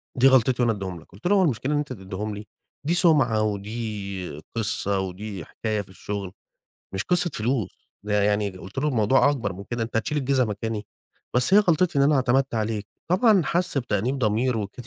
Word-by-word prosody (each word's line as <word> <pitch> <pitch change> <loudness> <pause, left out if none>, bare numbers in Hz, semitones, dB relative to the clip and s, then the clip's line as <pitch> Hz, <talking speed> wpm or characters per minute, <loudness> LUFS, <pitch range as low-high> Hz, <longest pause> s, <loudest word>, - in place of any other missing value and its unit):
دي 130 +1 +5
غلطتي 130 -1 +4
وأنا 115 -2 +3
أدِّيهم 95 -4 -5
لك." - - -19
قلت 100 - -5
له: 205 - +4
"هو 190 - +4
المشكلة 135 -1 0
إن - - +2
أنت 145 -3 -2
تديهم 100 +1 -5
لي؟ 105 +1 -9 0.4
دي 170 - +2
سمعة 145 - +4
ودي 100 -5 -4
قصة 100 -2 0
ودي 95 -2 -5
حكاية 110 -2 -3
في 95 - -14
الشغل، 100 0 -5 0.6
مش 95 0 -1
قصة 180 -2 +2
فلوس." 110 -4 -2
ده 105 -1 +1
يعني 105 0 +1
قلت 95 +4 -12
له: 145 +3 +1
"الموضوع 130 +1 +3
أكبر 115 -10 -2
من 100 +2 -8
كده، 120 +2 -3
أنت 115 - -7
هتشيل 150 +7 -1
الجزا 135 -2 +2
مكاني؟ 105 +1 -4 0.5
بس 125 +10 +3
هي 205 - +9
غلطتي 175 -4 +2
إن - - +5
أنا 145 +1 +4
اعتمدت 130 0 +2
عليك." 110 -2 -2 0.2
طبعًا 200 +2 +4
حس 175 -4 0
بتأنيب 125 +1 -1
ضمير 115 +2 +1
وكده 105 +3 -6
115 Hz, 195 wpm, -24 LUFS, 100-135 Hz, 0.6 s, هي